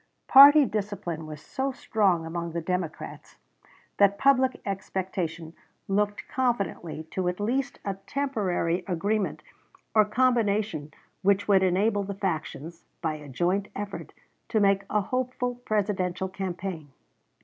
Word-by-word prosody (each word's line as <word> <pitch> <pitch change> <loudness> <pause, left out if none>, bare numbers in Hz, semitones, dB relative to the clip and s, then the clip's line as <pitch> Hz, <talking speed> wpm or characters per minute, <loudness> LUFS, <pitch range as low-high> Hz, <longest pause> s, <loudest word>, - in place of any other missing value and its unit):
Party 285 +2 +9
discipline 195 -8 -4
was 155 0 -9
so 270 - -2
strong 200 -9 +1
among 170 0 -4
the 170 - -1
Democrats 175 -1 -5 0.6
that 200 0 +4
public 260 0 +3
expectation 185 -4 -4 0.3
looked 205 +1 0
confidently 200 -10 -2
to 185 -1 -1
at 180 +2 -2
least 255 +6 -1
a 200 - -1
temporary 190 -10 -1
agreement 200 +4 -1 0.5
or 215 - +6
combination 210 - +1 0.3
which 200 +1 +2
would 195 -2 +5
enable 200 +3 +2
the 200 0 -5
factions, 170 -3 -4 0.2
by 160 -1 0
a 150 -2 -9
joint 180 +9 0
effort, 205 0 -6 0.4
to 220 - +2
make 195 -1 +3
a 210 - +2
hopeful 250 +2 -2
Presidential 190 -3 -1
campaign. 185 -4 -5
195 Hz, 125 wpm, -27 LUFS, 175-215 Hz, 0.6 s, Party